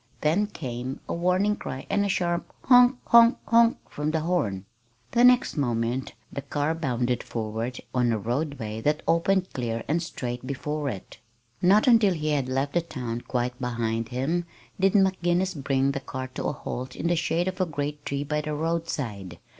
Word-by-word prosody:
Then 170 +8 +2
came 130 - -5
a - - -2
warning 180 +4 +2
cry 130 -9 -6
and 205 - +1
a 200 - 0
sharp 175 -3 -1
"honk 250 0 +6
honk 235 +1 +7
honk" 230 0 +4
from 150 +1 -3
the 160 0 0
horn. 130 - -1 0.5
The 240 - +3
next 250 -7 +5
moment 120 -1 -1 0.2
the 140 - -3
car 145 +3 -1
bounded 125 -6 -1
forward 115 +2 -4
on 125 -2 +2
a 110 - +1
roadway 120 -1 -3
that 150 +4 0
opened 185 +3 +2
clear 115 -2 -3
and 160 +4 +1
straight 125 -6 -5
before 145 +2 -2
it. 105 -1 -8 0.4
Not 195 +4 +5
until 225 -7 +5
he 155 -1 -2
had 140 -4 0
left 135 +2 -1
the 175 - +2
town 120 -7 -5
quite 125 +1 -3
behind 115 -2 -2
him 155 +8 -1 0.3
did 195 0 +3
McGinnis 185 -2 +2
bring 135 -1 +1
the 140 - -3
car 130 -1 -6
to - - -6
a - - +1
halt 130 -1 -6
in - - -5
the 175 +1 +3
shade 165 +2 0
of 185 0 -2
a 185 - +1
great 145 -1 -4
tree 140 0 -2
by 150 +1 -1
the 150 0 -3
roadside. 145 - -3
145 Hz, 180 wpm, -26 LUFS, 125-175 Hz, 0.5 s, honk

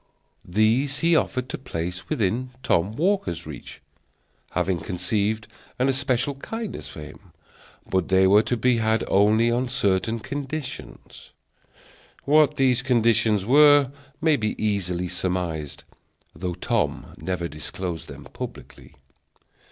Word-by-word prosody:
These 115 +9 +1
he 170 0 +4
offered 130 -4 0
to - - -4
place 90 -6 -5
within 115 +5 0
Tom 95 +2 +1
Walker's 145 - 0
reach, - - -10 0.7
having 95 -2 0
conceived 105 +5 -1 0.3
an 130 +2 +2
especial 135 0 0
kindness 200 - -6
for 70 - -9
him; 85 +5 -12 0.6
but 95 -2 0
they 95 0 +4
were 100 +3 +6
to 120 +2 -1
be 125 +2 +3
had 110 0 +1
only 110 +4 +4
on 125 +2 0
certain 110 -3 0
conditions. 140 +6 -7 0.9
What 150 0 +4
these 130 -2 +3
conditions 115 -5 +2
were 145 +1 +6 0.3
may 160 -2 +3
be 105 -1 -1
easily 90 -4 -1
surmised, 90 -4 -3 0.5
though 90 -1 -4
Tom - - -1
never 90 -2 -2
disclosed 85 +3 -6
them - - -10
publicly. - - -9
110 Hz, 120 wpm, -24 LUFS, 95-130 Hz, 0.9 s, were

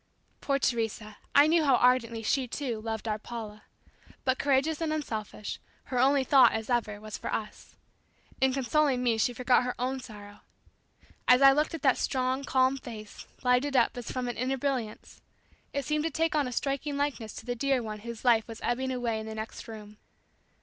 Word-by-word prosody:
Poor 275 -1 +1
Teresa, 225 -4 -2 0.2
I 285 - +8
knew 320 +1 +3
how 275 -3 +4
ardently 240 -2 +2
she, 260 +3 +1
too, 240 -3 -4
loved 225 0 -4
our 215 0 -1
Paula, 215 -2 -8 0.6
but 260 0 +1
courageous 290 +3 +1
and 320 -1 0
unselfish 220 -9 -4 0.2
her 255 -3 -3
only 270 +2 +4
thought, 265 0 +6
as 220 +2 -3
ever, 215 -4 0
was 215 0 -7
for - - -4
us. 215 -1 -5 0.7
In 265 0 +4
consoling 270 0 +1
me 230 -2 +2
she 245 - +2
forgot 250 +1 +3
her 250 0 -3
own 260 +2 -2
sorrow. 205 -4 -11 0.9
As 250 +2 +6
I 275 - +10
looked 300 +4 +1
at 320 - -9
that 265 -3 +3
strong 260 +1 0
calm 260 0 +2
face 215 -5 -10 0.2
lighted 250 +3 +2
up 240 -2 +3
as 245 -1 -6
from 255 -1 -3
an 240 - -4
inner 260 +2 -1
brilliance, 255 -5 -4 0.5
it 280 -2 -3
seemed 300 +1 0
to - - +1
take 325 0 0
on 290 -3 +2
a - - -5
striking 280 +3 -2
likeness 275 -6 -2
to - - -9
the 245 - -1
dear 265 0 0
one 215 -1 -6
whose 235 +2 -8
life 230 -3 +4
was 225 -1 -8
ebbing 260 +2 -1
away 240 -3 -1
in 220 - -7
the 220 - -6
next 220 +1 -7
room. 215 -2 -10
250 Hz, 195 wpm, -29 LUFS, 225-275 Hz, 0.9 s, I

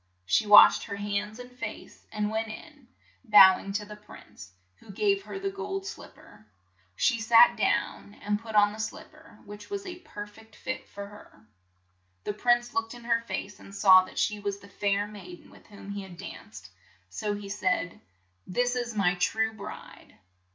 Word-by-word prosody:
She 90 - +2
washed 205 0 +8
her 200 - -5
hands 205 +1 -3
and 250 0 -11
face, 250 - -9
and 210 0 -2
went 220 +1 -2
in, 275 +4 -11 0.4
bow 200 -5 +8
ing 195 - -7
to 210 +1 -2
the 210 0 -10
prince, 150 - -14 0.3
who - - -20
gave 400 - +1
her - - -7
the 390 0 -3
gold 390 0 -5
slip - - -9
per. - - -18 0.5
She 235 -4 +1
sat 230 +2 +6
down 205 - -1
and 205 0 -2
put 225 -1 -8
on 205 0 +5
the 215 - -10
slip 220 - -6
per, - - -18
which 205 0 -11
was 400 -1 -5
a 360 -1 -8
per 210 - -8
feet 220 +1 -18
fit 260 - -6
for 200 0 -8
her. 200 - -16 0.8
The - - -3
prince 240 +2 +1
looked 225 +1 -2
in 240 - -12
her 230 0 +1
face, 205 -3 -6
and 195 - -13
saw 190 -2 +7
that - - -14
she 210 -1 0
was 200 -1 -3
the 200 - -16
fair 200 0 -1
maid 185 -4 -11
en - - -19
with - - -19
whom 200 -1 -11
he 200 0 -5
had 190 -3 -11
danced, 195 - -10 0.4
so 210 -2 -3
he 205 -1 -8
said: 185 -3 -2 0.2
' 90 +1 -42
' 95 +1 -43
This 245 0 +2
is 240 -2 -3
my 190 -4 +2
true 220 +5 0
bride 220 - -11
210 Hz, 200 wpm, -28 LUFS, 200-235 Hz, 0.8 s, washed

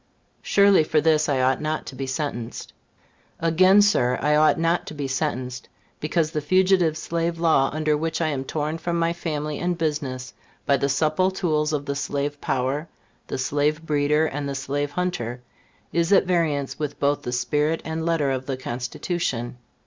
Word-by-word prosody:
Surely, 200 -4 +5
for 155 0 +2
this 155 0 +2
I 135 -2 +1
ought 130 +1 +2
not 155 0 -2
to 130 - -8
be 135 0 -4
sentenced. 130 -5 -4 0.7
Again, 185 +5 +5
Sir, 125 -12 +2
I 150 +1 +2
ought 155 +1 +4
not 165 +1 +1
to - - -7
be 145 -2 -3
sentenced, 130 -3 -3 0.3
because 155 +1 0
the 150 - -2
Fugitive 180 0 +3
Slave 170 +1 -2
Law, 160 -5 +3
under 155 0 +1
which 160 +1 -2
I 160 -2 +1
am 135 -3 -2
torn 155 +3 -3
from 170 +1 -2
my 170 0 +1
family 150 -3 -3
and 175 -1 -1
business 145 -6 -3 0.3
by 140 - +3
the 140 +1 0
supple 155 +6 +2
tools 155 -5 0
of 145 -2 -2
the 140 0 -2
Slave 145 +1 -3
Power, 135 +5 -1 0.4
the - - -3
slave 145 +4 0
breeder 150 +1 +2
and 145 -1 -3
the 140 - -3
slave 145 +2 -2
hunter, 130 -8 -3 0.5
is 170 +1 +1
at 195 - +5
variance 160 -7 0
with 150 -2 -4
both 145 0 +1
the 125 - -4
spirit 150 +6 0
and 160 0 -3
letter 160 -4 +1
of 130 0 -3
the 135 -2 -2
Constitution. 125 +1 -3
150 Hz, 180 wpm, -24 LUFS, 140-165 Hz, 0.7 s, Surely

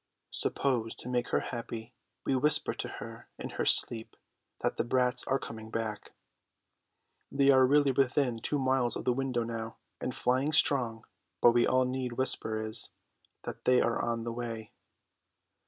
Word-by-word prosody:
Suppose, 120 -5 -1
to - - -10
make 125 -1 0
her - - 0
happy, 115 -1 -6 0.3
we 135 - +1
whisper 150 +3 +3
to - - -5
her - - -9
in - - -6
her - - -2
sleep 115 -1 +2 0.5
that - - -1
the - - +1
brats 125 0 +1
are 135 - +1
coming 110 -4 -9
back. 110 -2 -4 1.2
They 140 0 +4
are 130 -1 +5
really 145 0 +4
within 130 -2 +1
two 145 +5 0
miles 130 -2 +1
of - - -5
the 125 - +3
window 130 -2 -1
now, 115 -1 -5 0.2
and 125 - -4
flying 130 +5 +1
strong, 120 -7 +2 0.3
but 120 - +6
all 130 0 +3
we 125 - -2
need 130 -2 -3
whisper 115 -3 +1
is 110 0 +3 0.5
that - - -8
they 125 0 +5
are 115 - +1
on 115 -1 -2
the 115 0 -4
way. 115 -2 -6
125 Hz, 165 wpm, -30 LUFS, 115-130 Hz, 1.2 s, but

